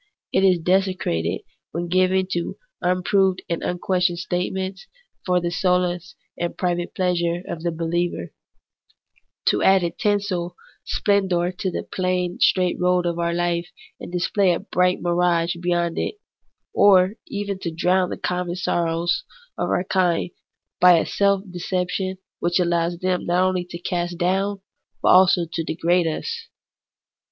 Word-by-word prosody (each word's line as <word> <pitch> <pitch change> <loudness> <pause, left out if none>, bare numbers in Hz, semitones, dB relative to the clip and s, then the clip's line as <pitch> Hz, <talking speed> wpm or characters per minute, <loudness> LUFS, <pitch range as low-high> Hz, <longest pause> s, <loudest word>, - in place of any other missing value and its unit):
It 190 - +3
is 185 -2 +5
desecrated 180 - 0 0.3
when 175 +1 -2
given 185 +1 +2
to 170 -1 -2 0.2
unproved 185 +1 +2
and 170 - -2
unquestioned 180 0 0
statements, 185 +2 -3 0.4
for 180 0 +3
the 175 0 -2
solace 180 0 0 0.2
and 175 0 -3
private 175 -1 -2
pleasure 175 -1 0
of 160 - -5
the 170 - 0
believer; 170 +1 -2 1.1
to - - +3
add 190 -1 +5
a 170 - 0
tinsel 200 -4 -1 0.3
splendour 190 -4 +1
to 185 +1 -3
the - - -4
plain 180 +1 -2
straight 180 -7 +3
road 180 0 +2
of 170 0 -1
our 170 0 0
life 175 0 -1 0.3
and - - -8
display 180 +1 +2
a - - -4
bright 180 0 +1
mirage 175 -1 +1
beyond 175 -1 0
it; - - -2 0.6
or 190 -1 +5
even 200 -1 -4
to 170 - -3
drown 180 +3 +1
the - - -4
common 180 -1 -2
sorrows 170 - 0 0.3
of - - -2
our - - +1
kind 180 -2 +1 0.5
by 180 -1 +7
a - - +1
self 200 -1 +1
deception 185 +1 -2 0.2
which 175 +1 +1
allows 170 -1 +1
them 185 0 -1
not 175 +1 +3
only 185 -1 -1
to 175 -1 -8
cast 175 0 -3
down, 195 +3 0 0.4
but - - +4
also 185 -1 +6
to 165 - -1
degrade 170 +2 +1
us. 460 - -4
180 Hz, 145 wpm, -23 LUFS, 175-185 Hz, 1.1 s, by